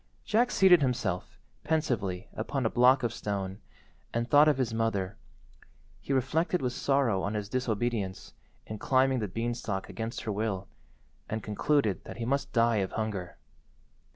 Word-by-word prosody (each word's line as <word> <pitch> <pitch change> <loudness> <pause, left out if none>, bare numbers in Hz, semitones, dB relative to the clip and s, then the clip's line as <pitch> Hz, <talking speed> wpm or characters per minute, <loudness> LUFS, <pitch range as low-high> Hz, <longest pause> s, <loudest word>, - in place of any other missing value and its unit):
Jack 235 +3 +3
seated 185 -7 +6
himself, 120 -9 -1 0.3
pensively, 115 - -1
upon 130 +4 -2
a 110 - +1
block 125 +2 +5
of 120 -1 0
stone, 100 -3 -4 0.5
and 115 0 -1
thought 145 +3 +6
of 150 -3 +3
his 125 -4 -1
mother. 110 -3 -1 0.8
He - - -6
reflected 155 +7 +1
with 125 -1 -2
sorrow 135 -10 +1
on 100 +3 -2
his 105 -1 -3
disobedience 115 -5 -2 0.3
in 110 -1 -7
climbing 130 +1 +2
the 105 - -2
beanstalk 115 -1 -3
against 115 +1 -4
her 110 - -3
will, 100 -2 -2 0.6
and 110 -1 -3
concluded 105 - +1
that - - -8
he 115 - -3
must 140 +3 -1
die 115 -1 +3
of 95 -2 -1
hunger. 105 -6 -3
115 Hz, 155 wpm, -29 LUFS, 105-130 Hz, 0.8 s, seated